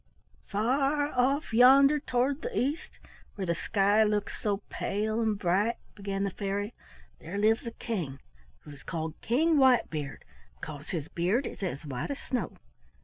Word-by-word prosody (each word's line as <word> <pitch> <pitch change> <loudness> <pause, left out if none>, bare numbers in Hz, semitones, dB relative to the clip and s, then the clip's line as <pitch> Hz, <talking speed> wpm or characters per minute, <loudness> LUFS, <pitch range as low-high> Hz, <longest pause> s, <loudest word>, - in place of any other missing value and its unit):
"Far 275 +7 +1
off 265 0 +1
yonder 275 +5 +7
toward 265 +1 0
the 485 -2 -4
east, 285 +6 -2 0.4
where 195 - -3
the 170 - +1
sky 200 +5 +2
looks 210 -1 -1
so 205 -1 -1
pale 215 +3 -2
and 220 -2 +1
bright," 200 +5 +1 0.2
began 195 -1 -3
the 200 - -1
fairy, 205 +3 -3 0.5
"there 170 +4 -6
lives 220 +3 +2
a - - -3
king, 170 - -4 0.4
who - - -12
is 140 -1 -12
called 160 -2 -4
King 310 +7 +2
Whitebeard, 225 - +2 0.3
because 150 -1 -8
his 160 -4 -3
beard 185 +11 0
is - - -7
as 170 -6 -4
white 130 -4 -4
as 280 - -3
snow. 255 - -3
210 Hz, 155 wpm, -29 LUFS, 185-255 Hz, 0.5 s, yonder